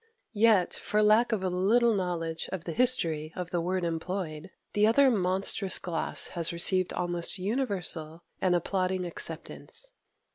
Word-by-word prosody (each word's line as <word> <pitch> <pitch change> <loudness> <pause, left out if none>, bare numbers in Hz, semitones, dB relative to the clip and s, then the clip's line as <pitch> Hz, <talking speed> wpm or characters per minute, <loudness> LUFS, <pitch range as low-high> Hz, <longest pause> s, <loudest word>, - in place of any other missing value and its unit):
Yet, 210 -4 +3
for 210 0 0
lack 215 +3 +4
of 210 -4 -1
a - - +1
little 215 +6 +3
knowledge 170 -4 -2
of 190 -3 -4
the 170 - -5
history 165 -9 +1
of 180 -1 -5
the 175 - 0
word 180 +1 -1
employed, 165 0 -4 0.2
the 210 +1 +4
other 265 +4 +5
monstrous 190 -1 +1
gloss 170 -2 +2
has 170 -2 +1
received 185 +2 0
almost 175 +1 -2
universal 185 - -2 0.2
and 180 -1 +3
applauding 185 +1 -1
acceptance. - - -6
185 Hz, 145 wpm, -28 LUFS, 170-210 Hz, 0.2 s, other